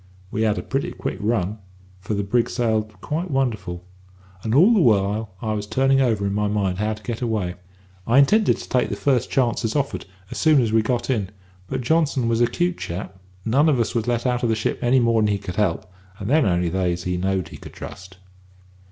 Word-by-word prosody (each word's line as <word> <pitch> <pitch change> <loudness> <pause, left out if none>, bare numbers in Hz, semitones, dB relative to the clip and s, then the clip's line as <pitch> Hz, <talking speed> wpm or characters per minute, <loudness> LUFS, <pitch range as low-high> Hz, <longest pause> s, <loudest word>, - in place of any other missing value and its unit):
"We 110 - -2
had 110 -2 +2
a - - -3
pretty 135 +1 -2
quick - - -4
run, 105 -1 -1 0.4
for 95 +3 -3
the 100 - -1
brig 115 +4 +1
sailed 110 -3 -1
quite 165 +4 -3
wonderful; 110 - -2 0.6
and 110 +4 -1
all 185 - +6
the 220 - +4
while 105 - +1
I 110 -1 -1
was 105 -1 -3
turning 135 +3 +3
over 110 -6 +1
in 100 - -1
my 105 0 0
mind 100 -3 -1
how 105 +1 0
to 110 - -16
get 120 -1 -4
away. 110 -7 -1 0.5
I 120 +3 +3
intended 205 +11 +4
to - - -9
take 125 - +1
the - - -2
first 130 -5 +1
chance 125 -3 +1
as 110 - -1
offered, 140 -7 -2 0.2
as - - -4
soon 155 -3 +5
as 115 -3 +1
we 110 - +5
got 120 +3 -1
in; 105 -7 -1 0.4
but 130 +3 -3
Johnson 140 -2 +1
was 115 0 +1
a 120 - +5
'cute 175 +4 -1
chap, 95 +2 -6 0.3
none 140 +8 +3
of 135 -5 +2
us 115 - 0
was 115 -1 -1
let 120 0 0
out 125 -1 +1
of 120 - +1
the 110 - +2
ship 110 - -2
any 125 +2 +4
more'n 115 -3 +3
he 100 -1 +1
could 90 -3 -7
help, 100 -6 0 0.3
and 100 - -6
then 155 -4 +4
only 90 -1 +1
they 90 0 0
as 90 +1 -6
he 90 -1 -1
knowed 95 -1 -1
he - - -10
could - - -12
trust. 95 0 -10
110 Hz, 230 wpm, -22 LUFS, 100-130 Hz, 0.6 s, all